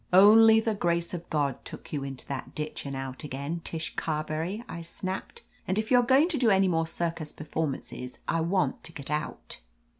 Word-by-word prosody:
"Only 220 +4 +8
the 225 0 0
grace 170 -3 0
of 175 -1 -6
God 140 -4 0
took - - -9
you 145 -2 -1
into 135 -2 -6
that 135 -2 -6
ditch 150 -1 -4
and 140 - -4
out 135 +1 -5
again, 145 +4 -4
Tish 160 -1 -4
Carberry," 160 +7 -2
I 170 - -6
snapped. 185 +3 -5 0.2
"And 190 - 0
if 220 +2 -1
you 250 - +7
are - - +3
going 265 +6 +5
to 315 - +1
do 240 -3 +4
any 195 -1 +5
more 165 -2 +1
circus 165 -2 -3
performances 145 -4 -4
I 165 - +1
want 185 +3 0
to 165 - -5
get 140 -1 -7
out.'' 150 - -4
165 Hz, 200 wpm, -28 LUFS, 150-195 Hz, 0.2 s, Only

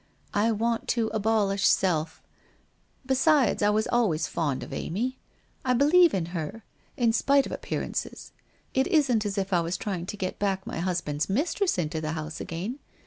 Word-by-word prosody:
I 215 +3 +2
want 230 +1 -1
to 225 -2 0
abolish 205 -2 +2
self. 165 -4 +1 0.8
Besides, 265 0 +3
I 205 - +4
was 215 +1 +2
always 205 -10 +2
fond 145 -5 -2
of - - -8
Amy. 245 +9 -3 0.4
And 250 -2 +2
I 280 - +5
believe 345 - +6
in 180 -4 0
her, 190 +7 -5 0.3
in 235 -3 +3
spite 275 +3 +3
of - - -7
appear - - -3
ances. - - -5 0.4
It 265 0 +2
isn't 250 -9 +2
as 200 0 -4
if 195 0 -1
I 175 - +4
was 170 +2 -2
trying 185 -3 -4
to 210 - -5
get 185 -1 -4
back 195 -2 -1
my - - -5
husband's 170 -4 -1
mistress 335 - 0
into 160 -2 -2
the 155 0 -2
house 155 0 -5
again. 195 - -5
205 Hz, 180 wpm, -27 LUFS, 175-245 Hz, 0.8 s, believe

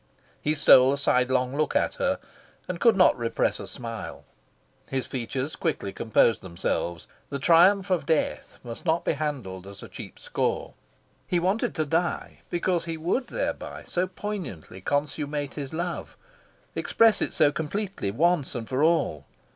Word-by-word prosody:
He 155 +1 +1
stole 130 -3 +7
a - - -1
sidelong 130 -1 +2
look 155 0 0
at - - +2
her, - - +2 0.5
and 180 -2 -4
could 230 +1 +5
not 185 - +6
repress 115 -2 0
a - - -7
smile. 115 -2 -7 0.6
His 135 -1 -1
features 130 +3 -3
quickly 125 - -2
composed 115 0 +3
themselves. 85 -1 -3 0.2
The 140 - -2
Triumph 180 +6 +5
of 170 -6 +1
Death 160 -2 0
must 115 -2 -8
not 170 0 +1
be - - +3
handled 130 -12 -4
as 100 0 -11
a - - -8
cheap - - -10
score. - - -2 0.5
He 180 - +1
wanted 190 +6 0
to 155 -2 0
die 165 +4 -1
because 175 -1 0
he 165 -1 -4
would 180 +11 -1
thereby - - -4
so 180 +1 -1
poignantly 180 - -6
consummate 145 - -2
his 140 -3 -5
love, 170 +2 -4 0.6
express 225 -2 +3
it - - +1
so 145 - +4
completely, 185 - -3
once 155 - +1
and 115 -2 -4
for 130 +1 -1
all... 155 - +2
150 Hz, 155 wpm, -26 LUFS, 125-175 Hz, 0.6 s, stole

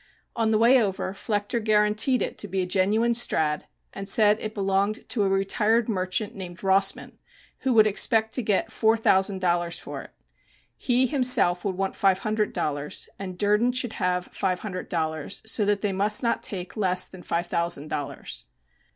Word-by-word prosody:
On 225 -1 +1
the 220 - +3
way 240 +3 +5
over 195 -2 -2
Flechter 205 +3 -2
guaranteed 215 +4 +2
it - - -4
to 205 - -1
be 190 0 -1
a - - -2
genuine 205 +6 +1
Strad., 155 -10 +1 0.3
and 195 +1 -6
said 210 +1 +4
it 215 0 -6
belonged 200 +2 -1
to 225 - 0
a 195 - +2
retired 210 +4 +1
merchant 190 0 -1
named 180 -2 -9
Rossman, 195 0 +1 0.4
who 265 - 0
would 220 -2 +6
expect 220 +1 +1
to 255 - 0
get 210 -4 0
four 220 0 +2
thousand 190 -3 +2
dollars 175 -1 0
for - - -7
it. - - -13 0.7
He 250 0 +1
himself 250 -9 +3
would 190 -3 -3
want 195 0 -2
five 195 -2 +2
hundred 215 +1 -1
dollars, 145 0 -3
and 185 -2 -6
Durden 210 +5 +2
should 245 -2 -2
have 180 -1 -2
five 185 -2 -2
hundred 185 -4 -6
dollars, 160 +1 -3
so 220 -1 0
that 205 -1 +1
they 205 - 0
must 210 +5 +2
not 235 - 0
take 180 -3 -6
less 185 -4 +2
than 185 - -12
five 170 0 -2
thousand 170 -3 -1
dollars. 145 - -6
200 Hz, 180 wpm, -25 LUFS, 185-220 Hz, 0.7 s, would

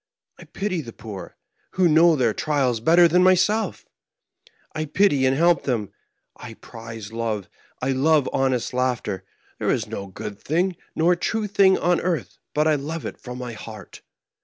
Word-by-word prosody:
I - - -12
pity 195 -4 -3
the 115 -5 -10
poor; 105 -4 -9 0.4
who 185 -1 +3
knows 165 0 +5
their 120 -4 +2
trials 135 -6 0
better 170 +8 +6
than 180 +2 +3
myself? 185 +3 +2 0.9
I 155 - -2
pity 145 -4 +3
and 130 +1 +1
help 170 +1 +4
them; 115 -7 -1 0.4
I 115 -2 -10
prize 115 -2 -10
love, 110 -4 -3 0.4
I 135 - +1
love 145 +2 +3
honest 130 -2 0
laughter; 125 -7 -1 0.4
there - - -1
is - - +1
no 100 - -6
good 100 +2 -8
thing 175 +4 0 0.2
nor 170 +2 +3
true 220 +5 -2
thing 195 -2 +4
on 175 +1 +1
earth 175 -4 -3 0.2
but 150 +1 +3
I 155 - +4
love 160 +3 -5
it - - -6
from 125 0 -8
my 125 -2 -6
heart. 110 -2 -10
145 Hz, 165 wpm, -23 LUFS, 115-175 Hz, 0.9 s, better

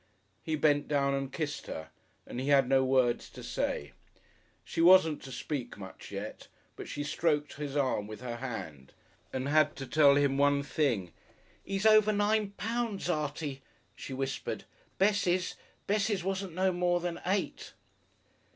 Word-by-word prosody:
He 160 - -2
bent 145 -1 +2
down 140 -2 +1
and 135 -1 -2
kissed 150 -2 -4
her, 80 - -6 0.3
and 120 - -6
he 130 - -3
had 140 -2 +5
no 135 0 +4
words 130 -2 +2
to - - -11
say. 70 +1 -2 0.7
She 165 - -2
wasn't 170 -3 +6
to 135 - -9
speak 125 -1 -4
much 95 -2 -10
yet, 100 +2 -7 0.3
but - - -8
she 145 - -4
stroked 150 -1 0
his 145 -1 -4
arm 130 -7 0
with 110 0 -8
her 120 -2 -4
hand 80 - -7 0.4
and 130 +1 -2
had 155 0 +3
to 135 0 -6
tell 140 0 +5
him 140 -1 +2
one 145 0 +3
thing: 120 - 0 0.5
"He's 195 +1 -3
over 215 -1 +6
nine 205 0 +1
pounds, 225 -4 -1
Artie," 150 -3 -3 0.3
she - - -8
whispered. 135 0 -3 0.3
"Bessie's 185 -2 +2 0.3
Bessie's 205 -2 +1
wasn't 190 -2 -3
no 190 +1 +2
more 175 0 +1
than 175 -1 -4
eight." 195 +1 -2
145 Hz, 155 wpm, -31 LUFS, 135-185 Hz, 0.7 s, wasn't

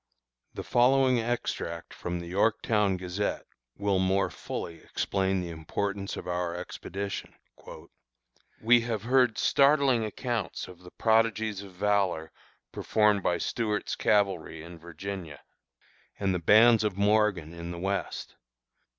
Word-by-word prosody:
The - - -5
following 130 0 +3
extract 110 -7 -3
from 90 0 -4
the 85 - -7
Yorktown 105 +1 +1
Gazette 90 +3 -3 0.3
will 100 -2 +1
more 95 +1 +1
fully 85 -1 -6
explain 95 +3 -1
the 85 -1 -5
importance 100 +5 -3
of - - -7
our 90 -1 -2
expedition: 95 +2 -6 1.3
"We 120 +1 +6
have 115 -3 -3
heard 125 -2 +3
startling 140 -4 +4
accounts 110 -2 -3
of 90 -1 -13
the 90 0 -13
prodigies 110 -1 +1
of 100 -2 -12
valor 95 -4 0 0.4
performed 105 -2 +2
by 85 -1 +1
Stuart's 105 0 -2
Cavalry 95 -6 0
in 85 0 -11
Virginia, 85 -2 -7 0.8
and 95 -2 +1
the 90 - -1
bands 110 +6 +6
of 105 -3 -1
Morgan 100 -5 +2
in 85 0 -7
the 85 - -6
West. 95 +3 -3
100 Hz, 125 wpm, -28 LUFS, 90-110 Hz, 1.3 s, We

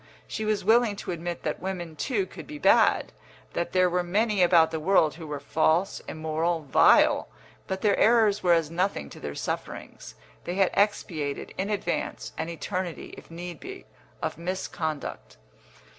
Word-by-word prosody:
She 220 - -4
was 215 -3 0
willing 225 -1 +4
to 200 - -5
admit 175 0 -5
that 155 - -2
women, 175 -3 -5
too, 205 - -1
could - - -11
be 300 - -7
bad; - - +4 0.4
that 170 - -2
there 185 -1 +4
were 180 0 +1
many 205 +3 +1
about 170 -2 +5
the 160 - -2
world 160 -2 +3
who 165 -1 -9
were 150 -1 -4
false, 160 +6 +1
immoral, 160 +2 -1
vile. 140 - +5 0.4
But 190 0 -3
their 205 -2 +3
errors 220 -3 +4
were 180 -2 +4
as 165 -2 +1
nothing 175 - -1
to - - -11
their 70 -1 -6
sufferings; - - -6 0.3
they 175 - -3
had 195 -1 +3
expiated, 160 -8 -1
in 195 +2 -2
advance, 210 -1 -3
an 165 - -3
eternity, 180 +1 -4
if - - -14
need 175 +1 -7
be, 385 +1 -9 0.4
of - - -3
misconduct. 170 -4 -4
175 Hz, 165 wpm, -27 LUFS, 160-200 Hz, 0.4 s, about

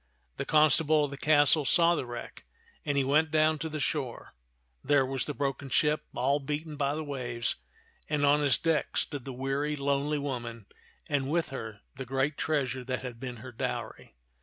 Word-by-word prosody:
The - - -3
constable 155 0 +4
of 145 - -2
the - - -5
castle 150 +1 +5
saw 170 +4 +5
the 145 -7 -2
wreck, 120 0 -8 0.4
and 145 -3 -1
he 140 - +3
went 150 +4 +3
down 155 0 +3
to 160 +3 -3
the 155 0 -4
shore. - - -3 0.5
There 145 -1 +3
was 135 0 -2
the 150 - -4
broken 140 -1 -2
ship 150 +5 +2
all 135 +4 +2
beaten 150 +2 -4
by 140 0 0
the 155 - -3
waves, 125 -5 -3 0.5
and 150 -1 +2
on 145 +1 +4
its 140 -4 +4
deck 165 -3 0
stood 140 -4 -2
the 135 - -5
weary, 135 +3 -1
lonely 140 +1 0
woman, 120 -6 -5 0.4
and 140 -2 -1
with 165 +2 0
her 110 -6 -7
the 135 -1 -7
great 135 +3 0
treasure 135 -5 -1
that 130 +1 -3
had 120 -3 -7
been 125 -1 -6
her 130 - -7
dowry. 115 - -5
140 Hz, 185 wpm, -29 LUFS, 130-150 Hz, 0.5 s, castle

